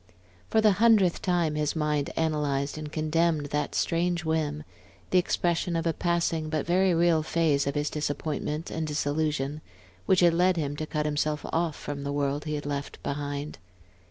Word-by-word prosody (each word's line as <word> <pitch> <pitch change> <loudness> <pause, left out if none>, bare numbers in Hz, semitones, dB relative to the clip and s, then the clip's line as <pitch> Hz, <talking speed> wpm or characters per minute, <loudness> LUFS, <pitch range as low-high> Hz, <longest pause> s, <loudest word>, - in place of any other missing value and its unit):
For 220 - +3
the 215 -1 +5
hundredth 215 -7 +5
time 175 -4 +1
his 150 0 -1
mind 150 -2 0
analyzed 145 -3 0
and 155 -1 -6
condemned 155 0 +1
that 150 -1 -1
strange 170 0 0
whim, 155 -2 -1 0.5
the 185 - +5
expression 175 -1 0
of 165 0 -1
a 165 - +1
passing 170 -2 0
but 155 -2 -1
very 180 +1 +3
real 165 -1 +3
phase 155 -3 +1
of 140 - -1
his 150 0 -1
disappointment 150 +1 -3
and 160 -1 -2
disillusion, 150 -1 -1 0.5
which 185 -1 +4
had 170 -1 +5
led 180 +1 +3
him 145 -2 -2
to 155 - -4
cut 150 0 -2
himself 150 0 -1
off 165 -2 0
from 140 -1 -6
the 140 - -3
world 145 +1 -1
he 150 -1 -2
had 145 - -5
left 145 -1 -4
behind. 145 +1 -4
155 Hz, 175 wpm, -27 LUFS, 145-170 Hz, 0.5 s, the